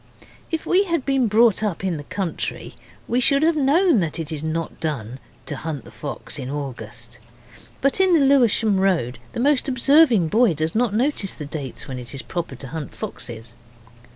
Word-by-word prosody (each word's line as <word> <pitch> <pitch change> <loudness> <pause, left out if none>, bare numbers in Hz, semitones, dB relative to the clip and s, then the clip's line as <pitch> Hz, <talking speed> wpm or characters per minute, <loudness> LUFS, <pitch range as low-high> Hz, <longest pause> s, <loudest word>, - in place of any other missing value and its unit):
If 325 -1 -3
we 380 +3 +3
had 335 -7 -1
been 270 -3 +2
brought 220 0 +4
up 205 -4 -2
in 180 -4 -1
the 145 - -7
country 180 +2 -4 0.3
we 245 - +1
should 275 +3 +3
have 325 0 +3
known 305 - +4
that 165 -4 -2
it 165 -1 -4
is 155 -1 -4
not 160 +1 -3
done 130 -6 -3 0.3
to 145 - -4
hunt 150 -2 -5
the - - -12
fox - - -4
in 125 - -5
August. 120 -4 -7 0.6
But 275 +7 +2
in 375 -2 +4
the 290 -4 +4
Lewisham 230 -7 +3
Road 165 -11 +1
the - - -4
most 280 +2 +2
observing 255 - +4
boy 220 -2 +3
does 155 +2 -1
not 225 -2 +1
notice 240 -5 +1
the 150 - -7
dates 140 -4 -6
when 130 -2 -5
it 120 +1 -7
is 135 - -4
proper 170 -6 -4
to 135 - -8
hunt 155 -1 -6
foxes. 115 -1 -6
190 Hz, 190 wpm, -22 LUFS, -, 0.6 s, brought